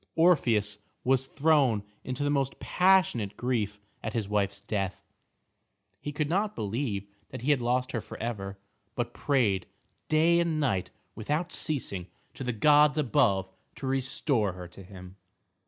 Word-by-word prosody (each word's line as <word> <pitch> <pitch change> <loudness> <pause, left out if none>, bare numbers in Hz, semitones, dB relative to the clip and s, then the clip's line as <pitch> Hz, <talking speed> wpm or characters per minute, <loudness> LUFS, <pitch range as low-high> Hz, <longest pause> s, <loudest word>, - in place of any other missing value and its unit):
Orpheus 115 - +3 0.2
was 130 0 +2
thrown 140 -8 +3 0.2
into 130 +3 -2
most 140 -2 0
passionate 180 - +3
grief 110 -5 -1 0.2
at 110 - -4
his 110 -4 -1
wife's 100 -1 0
death. 100 -2 -3 1.0
He 145 - -5
could 145 0 -1
not 205 +6 0
believe 105 -1 -2 0.2
that - - -8
he 145 - +3
had 140 -4 +2
lost 125 +2 0
her 120 - -2
for - - -10
ever, 100 -4 -4 0.4
but 120 -1 -2
prayed 110 -10 +1 0.4
day 165 +2 +4
and 165 -2 +1
night 110 -11 0 0.2
without 150 +10 -2
ceasing 105 - -2 0.3
to - - -7
the 125 - -1
gods 150 +6 +5
above 100 -8 +2 0.3
to - - -7
restore 130 - 0
her 90 -1 -8
to 90 +3 -13
him. 95 0 -12
125 Hz, 145 wpm, -29 LUFS, 100-145 Hz, 1.0 s, gods